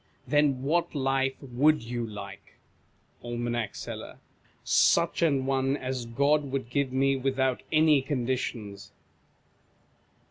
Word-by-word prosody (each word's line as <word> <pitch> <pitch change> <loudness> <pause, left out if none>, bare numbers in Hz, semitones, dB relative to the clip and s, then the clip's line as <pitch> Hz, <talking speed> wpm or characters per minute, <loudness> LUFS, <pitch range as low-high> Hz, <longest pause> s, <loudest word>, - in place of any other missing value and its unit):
Then 140 -1 +2
what 165 +4 0
life 135 -1 0
would 140 +3 +2
you 120 +1 -4
like? 105 -1 -10 0.7
Aim. 120 0 -3 0.2
Seller. - - -7 0.5
Such 170 +1 +3
an 140 -5 +2
one 135 +1 +1
as 130 -3 -4
God 140 +4 +1
would 130 -3 -3
give 140 0 0
me 135 +1 +2
with 135 0 -2
out 130 -1 +1
any 155 -2 +4
conditions. 120 -6 -3
135 Hz, 115 wpm, -28 LUFS, 125-140 Hz, 0.7 s, any